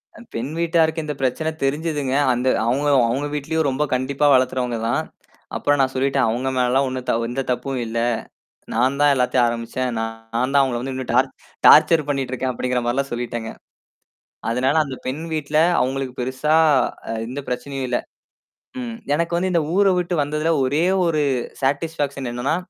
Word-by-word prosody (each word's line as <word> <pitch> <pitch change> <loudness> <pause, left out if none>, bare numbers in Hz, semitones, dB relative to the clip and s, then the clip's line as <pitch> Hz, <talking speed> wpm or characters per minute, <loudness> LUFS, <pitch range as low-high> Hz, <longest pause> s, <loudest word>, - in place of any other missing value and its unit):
அ - - -13
பெண் 120 +5 -3
வீட்டாருக்கு 165 -1 +2
இந்தப் 150 -2 -5
பிரச்சனை 135 +5 0
தெரிஞ்சதுங்க. 145 -1 -1 0.2
அந்த 125 +1 -1 0.2
அவுங்க 135 +5 +1 0.2
அவுங்க 130 +5 -1
வீட்லயும் 155 +1 -1
ரொம்ப 135 +3 0
கண்டிப்பா 130 +3 0
வளர்க்குரவங்க 125 -2 +1
தான். - - +1 0.5
அப்புறம் 145 0 +1
நான் 130 0 +1
சொல்லிட்டேன் 135 0 +2
"அவுங்க 125 +4 -1
மேல 125 -1 +2
எல்லாம் 135 +2 +3
ஒண்ணும் 130 -1 -5
தவ 115 0 +1
எந்த 130 +2 -2
தப்பும் 125 +2 -2
இல்ல, 115 +1 -3 0.7
நான் 130 +4 +1
தான் 145 0 +6
எல்லாத்தையும் 125 -1 +2
ஆரம்பிச்சேன். 115 +2 -2
நான் 115 0 -2 0.2
நான் 125 +3 +1
தான் 140 - +6
அவுங்கள 130 -3 0
வந்து 135 +1 -4
இன்னும் 130 -2 -4
டார்ச் 130 +2 +3 0.4
டார்ச்சர் 155 -1 +6
பண்ணீட்டுருக்கேன்" 130 -2 -1
அப்படிங்கிற 125 0 -1
மாரில்லாம் 135 +3 -1
சொல்லிட்டேங்க. 120 -1 -4 1.0
அதனால, 130 +4 +1
அந்தப் 135 -3 -8
பெண் 140 +5 -3
வீட்ல 150 -1 -1 0.2
அவுங்களுக்கு 130 0 -2
பெருசா 130 +5 0 0.5
அ - - -1 0.2
எந்தப் 135 +3 -6
பிரச்சனையும் 135 +2 -3
இல்ல. 120 - +1 0.8
ம், 240 -2 -5 0.2
எனக்கு 170 +3 0
வந்து, 185 +2 0
இந்த 170 -2 +2
ஊர 200 0 +4
விட்டு 180 0 -1
வந்ததுல, 150 +3 0
ஒரே 145 +6 +1 0.2
ஒரு 160 -3 +1 0.4
சாடிஸ்பாக்சன் 140 -1 -1
என்னான்னா? 125 +6 -1
135 Hz, 165 wpm, -21 LUFS, 125-150 Hz, 1.0 s, தான்